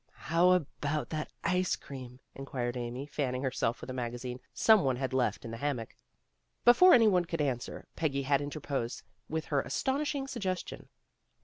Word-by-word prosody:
"How 175 +2 +6
about 150 -3 -2 0.3
ice 180 +1 +1
cream? 130 -2 -10
" - - -49
inquired 125 -3 -4
Amy, 125 +2 -4
fanning 135 -3 -2
herself 125 -3 -1
with - - -8
a - - -5
magazine 125 0 -4
some 220 -2 +5
one 130 -2 +2
had 130 +1 -3
left 130 -2 0
in 115 - -6
the 115 - -5
ham 145 +3 0
mock. 115 -1 -8 0.7
Before 350 +10 +8
any 230 -3 +6
one 180 -4 +3
could 165 -1 -4
answer, 130 -5 -2
Peggy 140 -4 0
had 140 +1 +2
in 145 - -3
terposed 140 -5 -3 0.3
with 160 0 -2
her 140 - +4
astonishing 275 0 -1
suggestion. 190 -8 -4
140 Hz, 175 wpm, -31 LUFS, 125-180 Hz, 0.7 s, Before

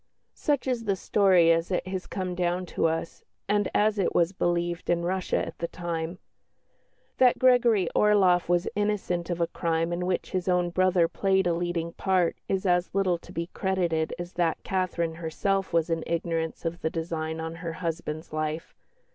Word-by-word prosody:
Such 290 -3 0
is 245 -3 -1
the 200 -2 +1
story 185 -3 +4
as 165 +1 +1
it 180 - -1
has 185 -1 -4
come 185 -2 -3
down 180 +1 -1
to 165 - 0
us, 165 +1 -3 0.2
and 205 -1 +1
as 210 0 +2
it 190 - 0
was 170 +2 +3
believed 175 -1 -1
in 170 0 +2
Russia 185 +1 0
at - - -9
the 170 - -1
time. 170 0 -4 1.0
That 250 -1 +5
Gregory 240 -7 +4
Orloff 190 -5 +4
was 175 +1 +2
innocent 200 -4 -1
of 175 -1 -2
a 170 - +3
crime 165 0 -1
in 180 +1 -2
which 185 - -2
his 185 -1 -2
own 180 -1 +2
brother 185 -1 +3
played 190 +1 +1
a 175 - +2
leading 170 -1 -2
part 185 -3 +1
is 195 0 0
as 180 0 +1
little 185 -3 +2
to - - -14
be 170 +2 -4
credited 175 -5 0
as 175 +1 -7
that 170 -2 0
Catherine 180 -3 -1
herself 185 +4 -1
was 165 0 +1
in 165 -1 0
ignorance 165 0 -2
of 170 +1 -3
the 160 - 0
design 160 -1 -3
on 160 0 -4
her 165 -1 -5
husband's 165 -2 -4
life. 155 +1 -3
175 Hz, 180 wpm, -27 LUFS, 165-190 Hz, 1.0 s, That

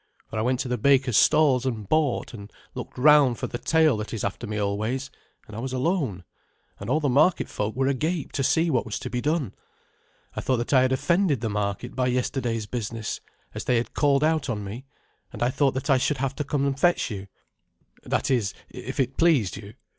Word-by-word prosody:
For 110 - -2
I - - +1
went 125 +2 0
to - - -4
the 125 -1 -2
baker's 130 -1 +3
stalls 145 -5 +4
and 115 -6 -3
bought, 150 -2 0
and 100 -3 -10 0.2
looked - - -8
round 140 -2 +5
for - - -3
the 120 - -5
tail 160 -6 +3
that 105 +2 -5
is 110 - -4
after 100 +4 -3
me 105 0 -3
always; 110 +7 -2 0.3
and 110 - -11
I - - -5
was 130 +2 -4
alone, 130 - -1 0.6
and - - -6
all 150 +5 +2
the 150 - 0
market 140 +7 +3
folk 105 +1 -3
were 135 +1 +1
agape 150 +4 -1
to 135 - -1
see 160 +5 +2
what 125 - +1
was 110 - -4
to - - -6
be 125 - -2
done. 150 - -1 0.8
I - - -3
thought 130 - +1
that 120 +4 -2
I 130 - +6
had 130 0 +2
offended 170 - +1
the 110 -3 -2
market 105 +3 -3
by 125 -1 +1
yesterday's 125 -3 -1
business, 115 -1 -4 0.3
as - - -6
they 125 - +2
had 115 - -2
called 140 -1 +2
out 155 -3 +1
on 105 -4 -2
me, 110 +7 -7 0.5
and - - -3
I 120 - +2
thought 140 -1 +1
that 130 +2 -1
I 130 - +5
should 145 +2 0
have 135 0 -1
to 150 - -1
come 140 -1 -1
and 140 -1 -1
fetch 175 -6 +2
your 100 -1 -6 0.7
that - - -1
is, 110 -6 0 0.2
if 125 +3 -7
it 135 0 0
pleased 150 - +3
you. 100 +1 -10
130 Hz, 220 wpm, -25 LUFS, 115-140 Hz, 0.8 s, I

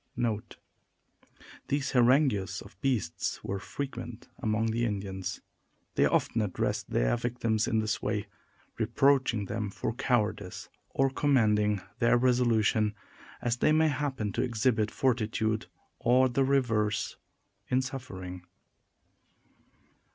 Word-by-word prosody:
These 140 0 -1
harangues 125 - +3
of - - -13
the 95 - -27
beasts 120 -11 -1
were 100 0 -3
frequent 125 -1 -6
among 110 -2 0
the 120 +1 0
Indians. 95 -4 -3 0.5
They - - +4
often 115 - +1
address 100 -4 -1
their - - +1
victims 115 -2 0
in 110 - +1
this 110 -2 0
way, 105 0 -1 0.5
reproaching 130 -6 +2
them 105 +1 -3
for 110 - -3
cowardice 110 -6 -1 0.2
or 135 0 +1
commending 105 -8 +2 0.2
their 120 +1 +4
resolution, 115 -4 +2 0.5
as 120 0 0
they 155 - +3
may 160 0 +4
happen 130 -7 -2
to 115 - -1
exhibit 115 -3 +1
fortitude 110 -3 0 0.3
or 125 +2 +4
the 135 +2 +1
reverse, 110 -6 +1 0.5
in 130 +1 +2
suffering. 95 -9 -7
115 Hz, 115 wpm, -29 LUFS, 105-130 Hz, 0.5 s, They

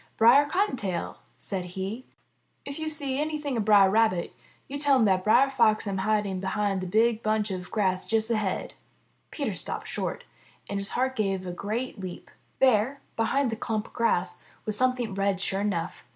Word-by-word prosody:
'*Brer 255 +6 +6
Cottontail/' 255 - -1 0.2
said 190 -3 -4
he, 205 +7 -4 0.6
*'if 280 +2 -6
yo' 315 - -3
see 285 -3 0
anything 300 -3 -2
of 220 -3 -1
Brer 205 -2 +7
Rabbit, 200 -3 +2 0.3
yo' 285 +1 -5
tell 285 -1 +4
him 245 -4 +4
that 190 -2 +2
Brer 265 +6 +4
Fox 225 -5 +3
am 195 -2 -2
hiding 205 -1 0
behind 195 0 -1
the 185 - -4
big 225 +4 +2
bunch 215 -1 0
of 185 -1 -5
grass 185 -4 0
just 225 0 +1
ahead." 215 -4 -1 0.6
Peter - - -3
stopped - - -5
short, - - -3 0.4
and 200 - -3
his 200 - -4
heart 260 +1 0
gave 195 -4 -1
a 180 - -4
great 215 +6 -4
leap. 185 -2 -8 0.3
There, 260 +1 +3 0.2
behind 235 +3 +1
the - - -2
clump 220 -1 -2
of - - -16
grass, 180 -6 0 0.2
was 215 - +1
some 255 +3 +2
thing 235 -5 -4
red, 195 -1 0
sure 195 0 0
enough. 185 -4 -2
215 Hz, 180 wpm, -27 LUFS, 195-255 Hz, 0.6 s, Brer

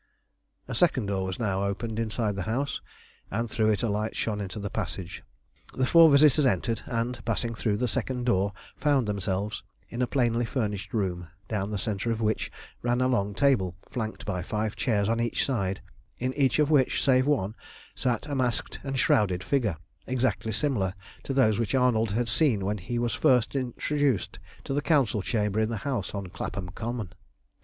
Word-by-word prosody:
A - - -4
second - - +2
door 95 -1 -1
was 95 -1 -3
now 100 -4 0
opened 110 +3 -2
inside 110 -2 -1
the 100 - -3
house, 140 +5 -1 0.5
and 115 +3 -1
through 110 0 +1
it 105 -3 +1
a - - +2
light 105 +1 -1
shone 105 -2 -1
into 95 +1 -5
the 100 -1 -4
passage. 90 -2 -4 0.5
The 130 - +2
four 165 +3 +8
visitors 145 0 +6
entered, 115 -1 +1
and, 120 0 -2
passing 115 -1 -1
through 110 -2 0
the 125 - 0
second 125 +2 -2
door, 100 -4 +2 0.2
found 140 -6 +2
themselves 100 +1 -2 0.3
in 120 - -4
a 125 - +2
plainly 120 -3 +1
furnished 105 -5 -2
room, 90 -5 -1 0.2
down 105 -2 -2
the 105 - -2
centre 100 +2 -2
of 115 -1 0
which 110 -1 0 0.3
ran 120 0 +1
a 130 - +3
long 105 -5 0
table, 105 -11 +2 0.2
flanked 110 -3 -4
by 95 -4 -2
five 105 +3 -2
chairs 105 -5 +1
on 115 +1 +1
each 120 -1 0
side, 100 -8 -1 0.4
in 130 +1 -1
each 135 -2 +2
of 150 0 +3
which, 135 -4 +3
save 130 -1 +4
one, 110 -9 +1 0.4
sat 120 -1 -1
a 145 - -4
masked 125 -5 -1
and 135 -1 -3
shrouded 95 -7 +2
figure 115 - 0 0.3
exactly 125 -3 0
similar 110 -6 0 0.3
to - - -5
those 125 -6 +3
which 115 +2 0
Arnold 120 -4 +3
had 120 +2 0
seen 110 -4 +2
when 105 +1 -1
he 120 +7 -4
was 120 -1 0
first 125 0 +3
introduced 135 -1 0 0.2
to - - -3
the 145 - +1
Council 140 -9 +2
chamber 105 0 0
in 110 0 +2
the 115 - -2
house 120 -9 -2
on 100 -1 -3
Clapham 95 0 -5
Common. 110 0 -4
115 Hz, 185 wpm, -27 LUFS, 100-130 Hz, 0.5 s, four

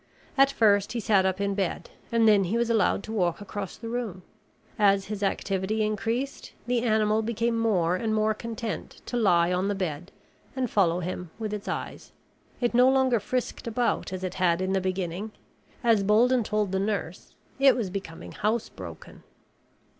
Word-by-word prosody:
At 275 0 +5
first 210 -4 +3
he 240 - -2
sat 200 -4 +3
up 190 0 -1
in 200 0 0
bed 195 -3 -3 0.2
and 230 -1 +4
then 205 -3 +5
he 205 +6 0
was 235 0 +1
allowed 220 -3 +2
to 220 - -7
walk 180 -6 0
across 205 -1 -6
the 230 - -8
room. 225 -6 -4 0.6
As 200 -2 +4
his 205 - -6
activity 200 +1 -1
increased, 225 +6 -2
the 240 0 +1
animal 215 -2 +2
became 230 +1 -1
more 190 -7 +2
and 220 +4 -2
more 215 0 +2
content 225 0 -6
to - - -5
lie 180 -6 +3
on 185 +2 0
the 205 - 0
bed 175 -2 -4 0.4
and 255 -3 -2
follow 180 -3 +2
him 180 0 -5
with 215 -2 -4
its 210 -1 -5
eyes. - - -5 0.5
It 240 -1 +1
no 250 +2 +6
longer 260 -3 +3
frisked 250 +3 -3
about 235 -3 0
as 185 0 -5
it 185 - -3
had 170 -1 +3
in 185 +1 -1
the 190 - +1
beginning. 185 +2 -3 0.5
As 230 -3 +4
Bolden 230 +5 +3
told 210 -2 -1
the 190 - 0
nurse, 195 -4 -3 0.2
it 275 -1 +6
was 215 -7 -2
becoming 185 -4 -7
housebroken. 220 +2 -4
210 Hz, 175 wpm, -27 LUFS, 190-230 Hz, 0.6 s, no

